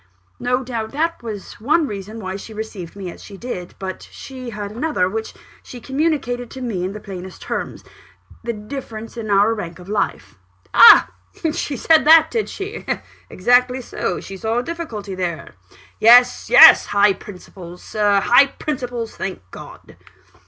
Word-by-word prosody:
"No 250 +1 0
doubt 230 -2 -5
that 330 +3 -1
was 215 -3 -8
one 305 +7 +2
reason 210 -1 -7
why 190 -2 -5
she 215 +2 -9
received 210 -6 -7
me 190 -3 -6
as - - -14
she 200 - -11
did; 185 -6 -7
but 190 -1 -6
she 255 -2 -9
had 205 -2 -6
another, 230 -6 -1
which 220 +3 -5 0.3
she 250 - -11
communicated 265 -3 -2
to 265 - -9
me 215 -8 -3
in 185 +2 -3
the 210 - -7
plainest 190 -3 -9
terms - - -5 0.6
the 235 - -2
difference 225 0 -8
in 225 -2 -6
our 205 +2 +3
rank 170 -6 -6
of 180 - -14
life." 105 - -3 0.3
"Ah! - - +8 0.4
she 280 - -3
said 320 +1 +4
that, 320 +1 +7
did 450 -2 -2
she? 405 +2 -7 0.5
Exactly 250 +5 +2
so 250 - -4
she 195 - -9
saw 220 +4 -2
a 245 - 0
difficulty 245 - -6
there? 175 -5 -4 0.5
Yes 245 +2 +5
yes! - - +8
high 205 0 +3
principles, 180 -3 -12
Sir 205 -2 +1
high 245 +6 +5
principles, 245 -5 -5
thank 190 - -5
God!" - - -13
220 Hz, 160 wpm, -20 LUFS, 195-255 Hz, 0.6 s, Ah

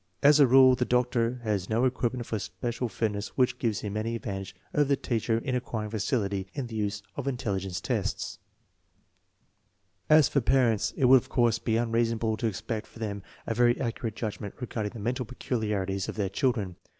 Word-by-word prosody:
As 150 +1 +7
a 140 - +7
rule, 130 +1 +7
the 125 0 +1
doctor 125 -1 +1
has 100 -4 -1
no 115 +3 +2
equipment, 125 -2 -1
or 110 - 0
special 120 +6 -3
fitness 105 -2 -3
which 125 -1 +2
gives 110 -4 0
him 105 -1 -4
any 115 +2 -1
advantage 100 -5 -5 0.2
over 145 - +3
the 140 0 +2
tmeher 115 -2 0
in 135 - -2
acquiring 115 -4 -3
facility 100 -3 -1
in 135 - -2
the 115 -2 -8
use 105 -1 -2
of 140 -1 -4
intelligence 100 -8 -2
tests, - - -2 1.7
i 155 - +8
AH 155 - +7
for 140 +1 +2
pa 120 - +2
rent 115 -5 +2
8, - - -5
it - - +5
would 130 0 +7
of - - -18
course 115 -2 +2
be 110 -1 0
unreasonable 115 -1 +1
to 115 - 0
expect 110 +2 -4
from - - -15
them 100 -2 -3 0.2
a - - -1
very 120 +1 +3
accurate 115 -3 -3
judgment 105 -3 -5
regarding 110 -4 -3
the 115 - -8
mental 125 +5 -1
peculiarities 105 -6 -2
of - - -4
their 100 -3 -1
children. 105 - -1
115 Hz, 195 wpm, -28 LUFS, 105-125 Hz, 1.7 s, i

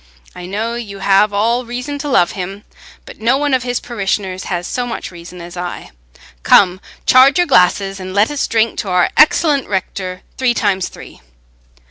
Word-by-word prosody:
I 180 - -8
know 220 +5 -3
you 220 -4 -6
have 195 +2 +3
all 230 +5 +1
reason 250 +4 -5
to 290 +1 -4
love 175 -10 +3
him, 195 +2 -6 0.4
but - - -13
no 240 +4 +3
one 290 -1 0
of 260 - +2
his 245 0 -2
parishioners 195 -4 -3
has 175 -1 -3
so 245 +4 -3
much 230 - -6
reason 175 0 -11
as 170 +1 -10
I. 175 0 -6 0.5
Come, 185 - +4 0.2
charge 260 +4 +6
your 355 - +3
glasses, 195 - +2
and 185 0 -7
let 205 +7 +2
us 290 - -1
drink 225 0 0
to 200 - -3
our 180 -1 +2
excellent 300 -2 +4
rector—three 190 +5 -3
times 195 -4 0
three!" - - -13
205 Hz, 175 wpm, -16 LUFS, 185-245 Hz, 0.5 s, charge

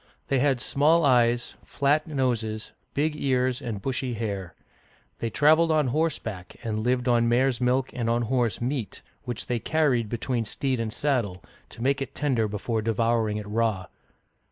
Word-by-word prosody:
They 135 - +2
had 135 -1 +2
small 145 +7 +3
eyes, 120 -2 +3
flat 145 +3 +1
noses, 115 -7 -1 0.2
big 150 +2 +1
ears, 130 -2 0
and 115 -6 -4
bushy 130 -2 -2
hair. 100 -6 -4 0.6
They 115 - -2
traveled 155 +6 +4
on 150 -4 +2
horseback, 120 - -2
and 110 -2 -2
lived 125 +2 0
on 120 -1 +3
mares* 125 0 +2
milk 130 +1 +1
and 120 -2 -2
on 120 +1 +1
horse 120 -4 0
meat, 125 -2 -3 0.2
which 120 -3 -4
they 120 -2 -1
carried 130 -7 +1
between 120 +1 -1
steed 130 +3 -1
and 115 -1 -2
saddle, 115 -10 -1 0.3
to 115 - -8
make 140 +1 +1
it 135 0 -5
tender 130 -7 +1
before 110 +2 -2
devouring 115 -1 +1
it 105 - -5
raw. 105 -3 0
120 Hz, 160 wpm, -26 LUFS, 115-135 Hz, 0.6 s, traveled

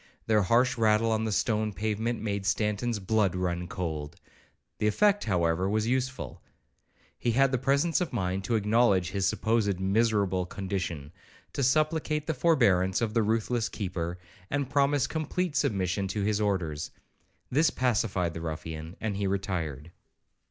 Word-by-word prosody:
Their 110 -1 +3
harsh 120 +6 +2
rattle 110 0 +3
on 110 0 0
the 110 - -1
stone 110 +1 0
pavement 110 +2 -2
made 100 -2 -2
Stanton's 105 +3 0
blood 100 -2 +1
run 90 -1 -2
cold; 80 -5 -4 0.6
the 105 - +1
effect, 205 - +3
however, 90 -2 +1
was 110 +1 +1
useful. 130 +2 -2 0.8
He 120 - 0
had 135 +2 +4
the 130 - +1
presence 140 +7 +2
of 180 - -2
mind 95 -4 -2
to 115 - 0
acknowledge 105 -4 +2
his 95 -1 0
(supposed) 105 -3 +1
miserable 100 -2 +1
condition, 90 -7 -4 0.4
to - - -2
supplicate 155 +2 +1
the 160 - -1
forbearance 110 - +3
of 115 -2 -1
the 115 - +3
ruthless 115 +2 0
keeper, 90 -4 -4 0.3
and 140 -2 -2
promise 140 -1 +3
complete 160 +1 -2
submission 95 -5 0
to 100 +2 -2
his 105 +1 +1
orders. 85 -8 -1 0.6
This 155 +5 +4
pacified 105 - 0
the 80 - -6
ruffian, 80 +1 -6
and 110 -3 -2
he 100 -1 0
retired. 85 -6 -3
105 Hz, 150 wpm, -28 LUFS, 95-120 Hz, 0.8 s, had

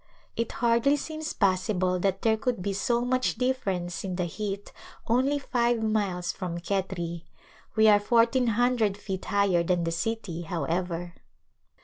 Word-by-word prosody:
It 230 - -2
hardly 235 +4 +3
seems 310 +1 -5
possible 185 -1 +1
that 195 +1 0
there 225 -1 +4
could 230 -3 -2
be 200 - -1
so 235 +4 +1
much 255 +1 +1
difference 195 -8 -1
in 185 -2 -3
the 180 -1 -1
heat 200 +3 -5 0.3
only 260 +5 +2
five 240 -4 0
miles 200 -5 0
from 175 -2 -5
Khetri 175 -2 -3
i - - -32 0.5
we 220 0 +5
are 205 -1 +7
fourteen 235 +3 +3
hundred 230 -3 +2
feet 190 -2 -5
higher 200 -3 +2
than 175 0 +1
the 165 - -1
city, 185 -1 -3
however. 170 +1 -3
200 Hz, 150 wpm, -27 LUFS, 180-235 Hz, 0.5 s, are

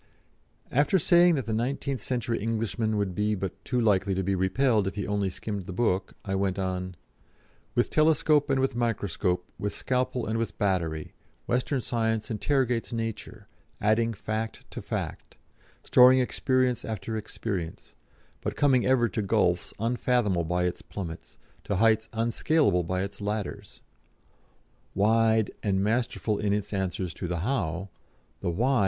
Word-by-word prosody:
After 145 +8 +3
saying 175 0 +5
that 135 - -2
the 110 - -2
nineteenth 130 +2 -2
century 120 -2 -2
Englishman 110 0 -1
would 100 -3 -1
be 105 +3 0
but 95 0 -5
too 125 - -1
likely 100 -4 +2
to 95 - -1
be 100 +2 0
repelled 100 +3 +2
if 95 - -3
he 100 - -2
only 100 -1 0
skimmed 100 0 -5
the - - -5
book, 95 -1 0
I 95 - -2
went 95 -1 0
on: 90 -1 -3 0.8
"With 120 - +1
telescope 155 -1 +3
and 135 -1 +2
with 135 -2 0
microscope, 100 -6 -1
with 105 0 -3
scalpel 125 -1 -1
and 110 +1 -1
with 115 -2 -3
battery, 85 -6 -1 0.3
Western 125 +2 0
Science 110 -1 -1
interrogates 125 0 0
nature, 115 -2 -5 0.3
adding 110 +2 +2
fact 110 +2 -4
to - - -6
fact, - - -5 0.5
storing 125 +1 +7
experience 130 -1 +1
after 110 0 -4
experience, 100 -5 -5 0.5
but - - -3
coming 130 -4 +3
ever 130 -2 +4
to 110 - -2
gulfs 90 -3 +1
unfathomable 115 -5 +1
by 90 +2 0
its 90 0 -2
plummets, 85 -5 -8 0.3
to 100 - -1
heights 110 +2 +3
unscalable 115 - +2
by 90 +2 -1
its 100 +1 -7
ladders. 105 -1 -4 1.1
Wide 110 +1 +3
and 95 -2 +1
masterful 110 -1 0
in 105 -1 +1
its 105 0 -2
answers 95 -3 -2
to 90 - -5
the 85 -1 -2
'How?' 95 -5 -1 0.5
the - - -2
'Why?' 125 +9 +2
110 Hz, 150 wpm, -27 LUFS, 95-120 Hz, 1.1 s, storing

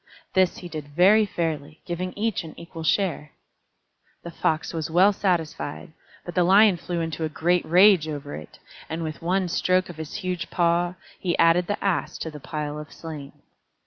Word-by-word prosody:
This 185 -1 +3
he 180 - -8
did 155 -4 -7
very 205 +5 +6
fairly, 160 -4 -3
giving 180 +1 -3
each 215 -2 -1
an 160 - -10
equal 170 0 -9
share. 160 -4 0 0.9
The 170 - -7
Fox 160 -1 -1
was 160 -2 -3
well 185 +5 +5
satisfied, 170 -4 -2 0.3
but 175 - -6
the 180 - +3
Lion 195 +1 +6
flew 170 0 -3
into 165 0 -3
a 155 - -1
great 175 +4 +1
rage 180 -1 +6
over 145 -1 -6
it, 75 - -10 0.3
and 165 +1 -3
with 155 -1 -5
one 185 +2 +1
stroke 185 +2 +1
of 170 - -9
his 160 -2 -7
huge 180 -1 -3
paw, 175 +1 +1 0.2
he 175 -2 -1
added 170 +1 +4
the 205 - -1
Ass 195 -3 0
to 160 - -5
the 150 - -9
pile 150 +1 -4
of 150 - -9
slain. 150 -4 -9
170 Hz, 180 wpm, -25 LUFS, 155-185 Hz, 0.9 s, very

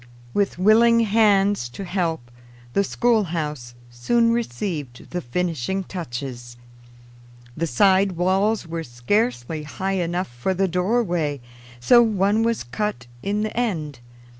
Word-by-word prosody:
With 200 -3 0
willing 230 +5 +5
hands 205 - +3
to 195 +11 -7
help, 165 -9 -2 0.4
the 200 - +3
schoolhouse 165 - -1 0.2
soon 230 - +2
received 155 - -4
the 180 - -2
finishing 175 +5 -2
touches. 120 -8 -7 1.0
The 165 +1 -1
side 190 +7 +3
walls 190 +4 +1
were 165 0 -4
scarcely 155 - -1
high 190 +6 -3
enough 175 +2 -2
for 120 +10 -2
the 195 +1 +1
doorway, 180 - 0 0.4
so 240 - +6
one 210 -1 +2
was 230 0 0
cut 120 - -3 0.2
in 205 +6 -1
the 215 - -4
end. 160 - -2
180 Hz, 120 wpm, -23 LUFS, 150-210 Hz, 1.0 s, so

